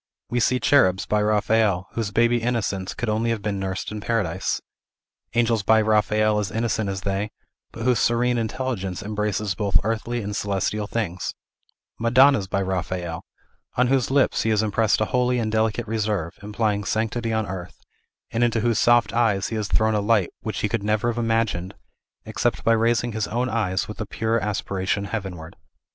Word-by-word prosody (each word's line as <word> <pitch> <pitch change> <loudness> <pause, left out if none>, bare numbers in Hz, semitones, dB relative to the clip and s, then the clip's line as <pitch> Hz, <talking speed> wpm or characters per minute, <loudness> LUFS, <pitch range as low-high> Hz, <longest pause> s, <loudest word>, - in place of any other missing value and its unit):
We 120 - +1
see 125 +2 +2
cherubs 95 -11 +3
by 105 0 +1
Raphael, 105 -2 +2
whose 115 -3 -2
baby 120 +3 +2
innocence 105 -5 -2
could 120 - -3
only 110 +2 0
have 115 -3 -2
been 100 -2 -2
nursed 95 +1 -3
in 105 -1 -5
paradise; 105 -7 -1 0.8
angels 115 -2 +2
by 110 +2 +4
Raphael 110 0 +2
as 105 - -2
innocent 110 -2 -1
as 95 -1 -3
they, 100 +2 -2 0.4
but 115 - -7
whose 125 -2 +3
serene 120 +1 +2
intelligence 110 -5 -3
embraces 105 -1 -1
both 100 +2 +1
earthly 115 +2 -2
and 100 0 -4
celestial 100 +1 -1
things; 95 -6 -3 0.6
madonnas 125 -1 +4
by 100 0 -1
Raphael, 90 -2 -3 0.5
on 125 0 +3
whose 135 -2 +2
lips 140 0 +2
he 115 - 0
has 110 -1 +2
impressed 110 0 +1
a - - +3
holy 125 0 +2
and 110 -2 -1
delicate 110 +1 0
reserve, 105 -6 -1
implying 105 0 -1
sanctity 115 +2 -1
on 110 -1 0
earth, 90 -2 -7 0.5
and 115 +2 +1
into 115 -2 +2
whose 115 -1 +1
soft 120 +1 +4
eyes 110 -5 +1
he 115 - -3
has 105 -2 -2
thrown 110 +1 +2
a 105 - +1
light 105 -3 +2
which 110 -2 -4
he 105 - 0
never 110 +3 +1
could 120 - -3
have 120 - 0
imagined 110 -5 0 0.5
except - - -1
by 115 - +3
raising 115 +1 +2
his 110 -1 -2
own 120 +3 -1
eyes 100 -5 -1
with 105 +1 -7
a 105 - -4
pure 115 +2 0
aspiration 100 -1 -2
heavenward. 95 -7 -6
110 Hz, 180 wpm, -23 LUFS, 100-115 Hz, 0.8 s, by